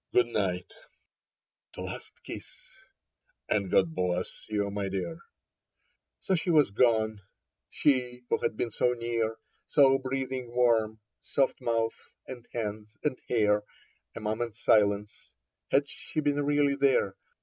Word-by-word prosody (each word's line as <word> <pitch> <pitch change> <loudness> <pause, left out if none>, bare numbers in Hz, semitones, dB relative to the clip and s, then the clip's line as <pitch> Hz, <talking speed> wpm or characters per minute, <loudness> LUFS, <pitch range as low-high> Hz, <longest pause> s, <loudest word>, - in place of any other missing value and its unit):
" - - -43
Good 125 - +6
night," 95 -5 -1 1.0
the - - -6
last - - -7
kiss, - - -7 0.5
" - - -47
and 100 -3 +1
God 165 - +3
bless 90 - -2
you, 100 -1 0
my 100 -1 -2
dear." 90 -4 -3 1.0
So, 190 - 0
she 180 0 0
was 150 -9 +5
gone, 110 -2 +2 0.5
she 125 -3 +1
who - - +1
had 110 - -1
been 120 - -1
so 125 +3 +2
near, 115 -2 -1 0.3
So 135 -2 +5
breathing 130 -2 -3
warm 110 -3 +3
— - - -58
soft 135 -1 +2
mouth 115 -1 +1 0.3
and 125 -2 -9
hands 105 -1 -4
and 145 -4 0
hair 105 -3 +3 0.3
— - - -38
A - - -5
moment 110 +1 -2
since. 105 -2 +2 0.4
Had 140 +1 +3
she 155 - -5
been 145 -1 +1
really 145 -1 +3
there. 135 -8 +2
115 Hz, 145 wpm, -29 LUFS, 105-135 Hz, 1.0 s, Good